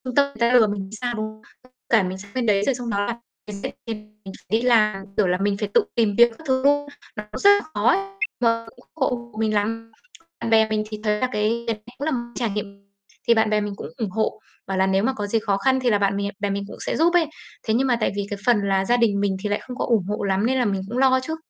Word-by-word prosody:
ta 285 - +6
người 280 - -11
ta 235 +1 +3
lừa 225 -3 +6
mình 205 -1 -3
thì 220 - -7
sao, 245 -1 -1
đúng 215 0 -2
không? 215 0 -10 0.2
Với 255 - -22 0.2
cả 220 -4 +5
mình 185 +1 -3
sang 200 +1 -12
bên 250 -2 0
đấy, 200 -2 +3
rồi 270 - +2
xong 245 -2 -5
đó 205 -1 0
là 235 - -2 0.3
mình 200 -1 -7 0.6
mình 190 - -8
phải - - -27
đi - - -4
làm, 215 -5 +3
kiểu 200 -3 +3
là, 180 0 +2
mình 200 0 +1
phải 210 -1 -3
tự - - +4
tìm 215 -4 +2
việc 235 0 +7
các 320 - -15
thứ 260 0 +1
luôn, 290 0 +3 0.3
nó 210 - -5
cũng - - -5
rất 405 - +6
là 405 0 +6
khó 210 +3 0
ấy, - - +5
nên 390 0 -5 0.4
là 230 0 -4
không 225 - -15
ủng 245 - -21 0.4
hộ - - -13
mình 215 -1 +1
lắm. 225 +2 -1 0.5
Bạn 230 - -2
bè 220 -1 +4
mình 215 0 0
thì 215 -1 -6
thấy 210 -1 +1
là 255 - +1
cái 225 +2 0
cái 225 - 0
này 215 +1 -24
cũng 285 - -4
là 315 - 0
một 250 - 0 0.2
trải 235 -3 -1
nghiệm 200 -1 -5 0.5
thì 235 - +7
bạn 220 -1 +2
bè 210 0 +2
mình 205 -1 -3
cũng 145 - -7
ủng 220 -4 -2
hộ, 220 +1 -1 0.3
bảo 195 -1 -2
là 190 0 +3
nếu 190 +1 +2
mà 265 - +1
có 205 -4 -4
gì 225 +2 +1
khó 205 -3 0
khăn 260 +5 +2
thì 250 -2 +1
là 205 - +4
bạn 200 0 +1
mè 200 0 -1
bè 205 -1 -1
mình 200 0 -2
cũng - - -9
sẽ - - -1
giúp 340 +3 +3
ấy. 350 -2 +4 0.4
Thế 220 - +2
nhưng 265 +3 +2
mà 245 - +3
tại - - +2
vì 200 0 -2
cái 205 -1 -4
phần 235 -4 +4
là 195 -1 +1
gia 240 +3 +3
đình 220 -4 +2
mình 200 -1 0
thì 210 - -1
lại 205 - 0
không 250 - -6
có - - -1
ủng 220 -7 +2
hộ 210 +1 -2
lắm 195 +2 +1
nên 260 +2 +1
là 245 - +2
mình 195 -2 0
cũng 240 - -3
lo 260 0 +4
chứ. 320 +2 -3
215 Hz, 305 wpm, -23 LUFS, 200-245 Hz, 0.6 s, việc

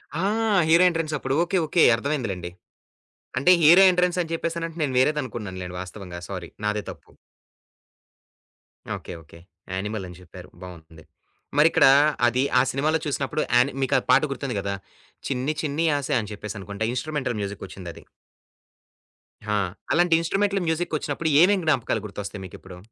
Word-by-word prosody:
ఆ! 170 +4 -1 0.4
Hero 170 +3 +5
ఎంట్రన్సప్పుడు 155 -5 -2
okay. 185 +2 -1
Okay. 160 +2 +3
అర్థమైందిలెండి. 115 -10 -3 0.9
అంటే 180 - +5
hero 175 +5 +8
ఎంట్రన్సని 180 -2 0
చెప్పేసనంటే, 165 0 -4
నేను 135 -3 -1
వేరేదనుకున్నానులెండి 110 -11 -2
వాస్తవంగా 90 -2 -9
సారీ 90 -3 -6
నాదే 105 0 -1
తప్పు. - - -14 1.9
ఓకే. - - -9
ఓకే. 80 +2 -16 0.3
'యానిమల్' 95 0 -4
అని 90 - -12
చెప్పారు 90 - -13
బావుటుంది. 80 -3 -12 0.5
మరిక్కడ 155 -1 +5 0.4
అది 125 +3 +1 0.2
ఆ - - +6
సినిమాలో 155 +4 0
చూసినప్పుడు 145 +1 -2
యాని 125 +3 +4
మీకా 130 - +2
పాట 130 - +6
గుర్తుంది 135 -4 -4
గదా! 100 0 -3 0.5
'చిన్ని 135 +2 -1
చిన్ని 155 +2 -1
ఆశ' 140 - -3
అని 105 0 -8
చెప్పేసనుకుంట 100 0 -8
ఇన్స్ట్రుమెంటల్ 130 -3 -3
మ్యూజిక్కొచ్చిందది. 95 -4 -8 1.4
హా! 105 0 0 0.3
అలాంటి 175 0 +3
ఇన్స్ట్రుమెంటంల్ 195 +3 0
మ్యూజిక్కొచ్చినప్పుడు 160 -1 -2
ఏమేం 200 +1 +4
జ్ఞాపకాలు 125 -7 0
గుర్తొస్తాయి 100 -1 -7
మీకిప్పుడు? 90 0 -12
130 Hz, 125 wpm, -24 LUFS, 100-160 Hz, 1.9 s, Hero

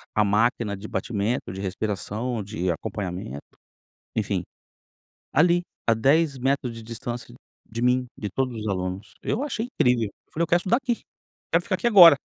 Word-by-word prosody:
a 105 - +5
máquina 105 0 +2
de 100 +2 -8
batimento, 110 +2 -1
de 95 - -5
respiração, 105 +4 -2
de 95 -3 -1
acompanhamento, 90 -5 -4 0.7
enfim, - - 0 0.9
ali, 175 +4 +5 0.2
a 115 - +6
10 140 +5 +3
metros 130 -1 0
de 115 -1 -9
distância 120 +1 -6 0.3
de 115 +1 -5
mim, 125 +1 +3
de 105 - -3
todos 125 +1 -1
os 110 - -4
alunos, 95 +1 -3
eu 245 - 0
achei 240 -6 -2
incrível, 125 - +2
eu 100 - -19
falei: 165 - +1
"Eu 170 - 0
quero 175 - +4
estudar 190 +7 +2
aqui, 250 -3 -1 0.5
quero - - +4
ficar - - 0
aqui 240 - 0
agora". 180 -9 +10
115 Hz, 165 wpm, -25 LUFS, 105-140 Hz, 0.9 s, agora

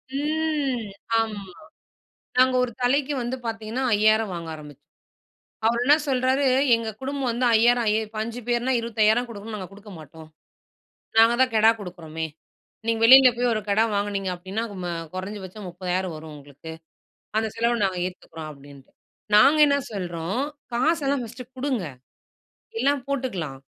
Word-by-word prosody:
ம் 295 -4 -1 0.4
ஆமா. 220 -2 -2 1.0
நாங்க 255 0 +5
ஒரு 250 - -2
தலைக்கு 275 +3 +1
வந்து 240 +2 -3
பார்த்தீங்கன்னா 225 +2 -3
5,000 215 0 +3
வாங்க 170 -1 -6
ஆரம்பிச்சோம். 145 -2 -13 0.8
அவர் 235 +1 +2
என்ன 285 +3 +7
சொல்றாரு 260 +1 +2 0.3
எங்க 230 -1 -2
குடும்பம் 270 -1 -2
வந்து 240 +2 -1
5,000 220 -2 +2
5 235 +2 -5
பேர்னா 240 +2 +1
25,000 230 +1 +2
குடுக்கணும். 215 0 -8
நாங்க 185 -3 -7
குடுக்க 205 +1 -13
மாட்டோம். 155 +1 -13 0.9
நாங்க 225 +1 +7
தான் 260 -2 +3
கெடா 220 +1 +6
குடுக்குறோமே, 165 -4 -6 0.6
நீங்க 230 -1 0
வெளியில 260 +2 +9
போய் 245 0 +1
ஒரு 215 - -1
கெடா 205 +2 +3
வாங்கினீங்க 200 -1 -1
அப்படின்னா 190 +5 -4 0.5
கொறஞ்சபட்சம் 190 +1 -7
30,000 180 0 -3
வரும் 155 0 -9
உங்களுக்கு. 145 +3 -11 0.7
அந்த 220 0 +1
செலவ 235 +1 +1
நாங்க 190 -2 -2
ஏத்துக்கிறோம் 165 -3 -8
அப்படின்ட்டு. 140 -1 -15 0.4
நாங்க 275 +9 +7
என்ன 280 0 +3
சொல்றோம் 175 +1 -3 0.3
காசெல்லாம் 280 +1 +1
ஃபர்ஸ்ட்டு 240 +2 -10
குடுங்க 255 -7 -1 1.0
எல்லாம் 280 -1 +1
போட்டுக்கலாம். 195 - -3
220 Hz, 130 wpm, -24 LUFS, 185-250 Hz, 1.0 s, வெளியில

